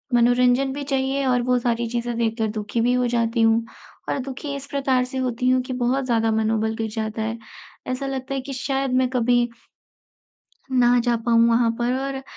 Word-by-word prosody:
मनोरंजन 245 +2 +3
भी 285 +1 -5
चाहिए 270 0 -1
और 250 -1 +2
वो 250 0 +2
सारी 235 -1 -1
चीज़ें 240 0 -2
देखकर 225 -1 0
दुखी 215 +2 -2
भी 245 +2 +2
हो 250 0 +1
जाती 230 -1 0
हूँ। 225 0 +3 0.4
और - - -1
दुखी 275 +2 -5
इस 280 0 -7
प्रकार 265 -2 +1
से 260 +1 -7
होती 250 -1 0
हूँ 255 0 +3
कि 255 0 -5
बहुत 255 +2 0
ज़्यादा 225 -2 +1
मनोबल 220 0 0
गिर 225 0 -3
जाता 220 0 -3
है। 225 +1 -2 0.5
ऐसा 255 +2 -3
लगता 270 0 -4
है 270 - -2
कि 275 +1 -7
शायद 270 0 -2
मैं 255 - +1
कभी 245 -1 +2 1.2
ना 245 -1 +4
जा 240 -1 +2
पाऊँ 230 0 +5
वहाँ 230 0 +3
पर 240 +1 0
और 270 -1 -4
245 Hz, 195 wpm, -23 LUFS, 230-265 Hz, 1.2 s, पाऊँ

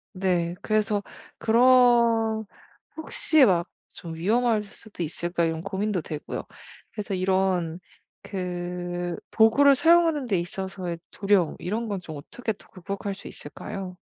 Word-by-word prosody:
네. 180 -2 0
그래서 215 -1 +1 0.4
그런 235 -2 +4 0.5
혹시 315 -2 +3
막 175 -4 +2 0.3
'좀 165 -2 -8
위험할 220 +5 +2
수도 210 -1 -11
있을까.' 170 +2 -2
이런 160 0 -2
고민도 195 0 -1
되고요. 150 -1 -5 0.5
그래서 205 -2 -5
이런 185 -2 +1 0.4
그 175 -2 -4 0.2
도구를 280 +6 +6
사용하는 325 -1 +4
데 195 -6 +1
있어서의 180 0 -4
두려움 195 -5 +2
이런 220 +6 -3
건 200 -3 -2
좀 160 -3 -8
어떻게 220 +10 -4
또 205 - -20
극복할 195 +2 -5
수 - - -11
있을까요? 185 -2 -7
195 Hz, 270 characters per minute, -26 LUFS, 175-225 Hz, 0.5 s, 도구를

